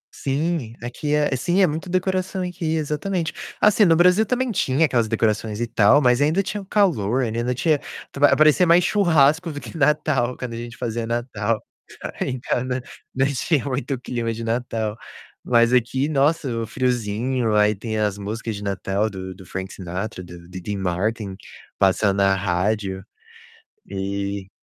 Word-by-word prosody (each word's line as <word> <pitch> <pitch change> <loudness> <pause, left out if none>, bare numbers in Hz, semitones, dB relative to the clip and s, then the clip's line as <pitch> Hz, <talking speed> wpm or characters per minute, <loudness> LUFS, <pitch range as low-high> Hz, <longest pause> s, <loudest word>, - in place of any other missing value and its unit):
Sim, 140 -4 -2
aqui 145 +5 -2
é 150 -3 +1
sim, 175 +9 +1
é - - +7
muito 160 +4 -4
decoração 185 +1 -1
aqui, 175 -3 -2
exatamente. 160 +3 -2 0.3
Assim, 210 0 +5
no 165 -4 +5
Brasil 180 +5 +5
também 250 -1 0
tinha 155 -4 +2
aquelas 120 -6 +1
decorações 110 -1 0
e 120 - 0
tal, 120 +5 +4
mas 125 +2 +4
ainda 160 +7 +2
tinha 205 +2 -4
o 195 - -12
calor, 135 - +2
ainda 120 +2 -1
tinha 150 +2 +2 0.3
tu - - -8
vai 145 0 +6
parecia 155 +4 +5
mais 170 +2 +6
churrasco 165 -4 +3
do 145 - -6
que - - -10
Natal 145 -5 +1
quando 125 -2 -5
a - - -5
gente 120 +1 -7
fazia 115 0 -3
Natal. 115 -2 -1 0.6
Em 130 -1 -2
casa 125 +1 -2 0.3
não 135 - +3
tinha 145 +2 0
muito 135 0 -2
clima 120 -2 -3
de 115 +1 -6
Natal. 115 -2 -2 0.5
Mas 120 0 +3
aqui, 130 +3 +2
nossa, 150 +1 +1
o 115 - -3
friozinho, 120 -1 -1
aí 105 0 +4
tem 110 +2 -4
as 105 -2 0
músicas 110 +2 -4
de 100 - -7
Natal 100 +2 -1
do 95 -1 -7
do 95 0 -14
Frank 95 +1 -5
Sinatra, 90 +1 -5
do 85 -1 -12
Diddy 95 +3 -5
Martin 95 +2 -2 0.4
passando 100 +1 +3
na 95 -1 +3
rádio. 95 +1 -1 0.9
E 100 0 -3
120 Hz, 165 wpm, -22 LUFS, 105-150 Hz, 0.9 s, é